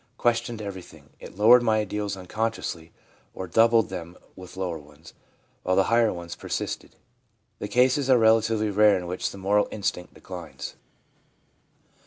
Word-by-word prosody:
Questioned 120 -2 0
everything. 95 -3 -10
It - - -12
lowered 120 +4 +7
my 110 -2 +2
ideals 105 -1 -3
unconsciously, 95 -4 -4 0.4
or 95 - -5
doubled 115 +5 +3
them 85 +1 -7 0.2
with 95 0 -12
lower 90 -4 -3
ones, 75 +2 -16 0.5
while 95 - 0
the 95 - +4
higher 115 -2 +4
ones 85 -1 -7
persisted/ - - -5 0.6
The 105 - -4
cases 130 +4 +2
are 130 - +6
relatively 110 -1 +3
rare 105 +1 +5
in 90 - -5
which 90 +1 -3
the - - -10
moral 100 +2 +2
instinct 100 -4 -4
declines. 90 -4 -8
105 Hz, 145 wpm, -25 LUFS, 90-115 Hz, 0.6 s, lowered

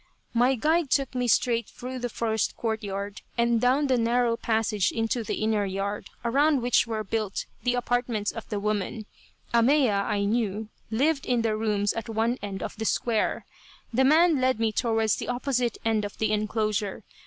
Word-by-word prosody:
My 245 +3 +3
guide 310 +4 +1
took 275 -1 +1
me 250 -1 -1
straight 235 0 +2
through 255 +1 -7
the 245 0 -3
first 220 -1 -1
court 220 -2 -2
yard, 200 0 -5 0.2
and 235 -1 +2
down 260 +4 +3
the 260 -3 +2
narrow 235 0 +2
passage 220 -4 0
into 225 +1 -1
the - - -2
inner 215 -1 +1
yard, 200 +1 -3 0.2
around 280 +2 +3
which 245 -1 +3
were 220 -1 -2
built 215 -1 -2 0.2
the 245 0 +1
apartments 245 -3 0
of 225 - -8
the 210 - -2
woman. 210 +1 -2 0.5
Ahmeya, 235 -3 +4
I 205 -1 0
knew, 215 -1 -1 0.2
lived 275 +6 +1
in 245 -2 +1
the 220 -2 +1
rooms 210 -2 0
at 230 0 -5
one 225 +3 0
end 195 -2 -5
of - - -6
the 220 - -3
square. 225 0 0 0.5
The 260 +3 +3
man 310 +1 +5
led 255 -2 +2
me 225 -1 +1
towards 225 -1 +1
the - - -5
opposite 245 -1 -1
end 220 -2 +2
of 205 - -6
the 220 -1 0
enclosure. 215 -1 -1
225 Hz, 180 wpm, -26 LUFS, 215-245 Hz, 0.5 s, man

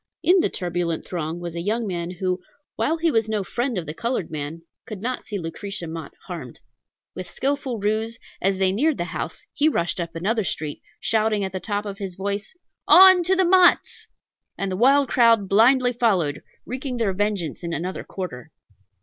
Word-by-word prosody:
In 365 +2 +5
the - - +2
turbulent 175 -2 -2
throng 165 -1 -4
was 175 -1 -6
a 170 - -4
young 220 +5 -1
man 175 -3 -3
who, 180 0 -2 0.3
while 325 - 0
he 330 0 +1
was 225 -4 +1
no 215 -2 0
friend 240 +4 -2
of 175 - -3
the 150 - -5
colored 235 -2 -2
man, 155 +2 -5 0.2
could 215 -3 -6
not 250 +5 -3
see 210 - -4
Lucretia 175 +2 -5
Mott 160 -2 -7
harmed. - - -8 0.5
With 185 -1 -7
skilful 270 -3 -2
ruse, 220 +2 -1 0.2
as 195 0 +1
they 190 -1 +2
neared 285 +9 +1
the - - -1
house, 175 - -5
he 310 0 +3
rushed 175 - -1
up 170 -1 -4
another 215 +6 0
street, 155 -4 -4 0.2
shouting 215 -2 +1
at 190 - -3
the 185 - -4
top 205 +1 -3
of 200 0 -6
his 190 -3 -5
voice, 200 - -4 0.3
"On 375 -1 +9
to 380 +2 +3
Motts!" 365 0 +4 0.5
and 195 -1 -2
the - - -1
wild 270 +6 +4
crowd 230 -4 +4
blindly 245 +5 +4
followed, 190 - +1 0.2
wreaking 255 0 -4
their 220 -5 0
vengeance 195 -6 -2
in 170 -1 -4
another 175 +4 -3
quarter. 160 -6 -7
200 Hz, 185 wpm, -23 LUFS, 175-240 Hz, 0.5 s, On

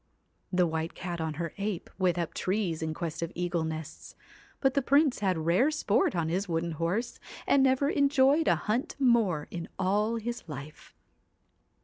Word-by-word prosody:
The 180 -1 +3
White 160 0 -3
Cat 175 -2 -4
on 160 -1 -2
her 170 +1 -4
ape 200 -3 -3
went 180 -2 +2
up 170 -2 -2
trees 185 -4 -1
in 160 0 -2
quest 170 -1 -4
of 170 - -3
eagle 175 -1 -1
nests; 160 0 -6 0.4
but 270 -2 +2
the 280 - +2
Prince 280 +1 +3
had 190 -4 +1
rare 170 - +3
sport 260 -10 +1
on 165 -2 0
his 185 +4 -1
wooden 165 0 -1
horse, 170 +9 -2 0.3
and 280 - +4
never 265 +1 +3
enjoyed 285 +1 +3
a - - +5
hunt 225 +5 -2
more 230 - +2
in 170 -1 -6
all 205 +4 +1
his 235 +1 -4
life. 150 0 -9
185 Hz, 170 wpm, -29 LUFS, 165-240 Hz, 0.4 s, a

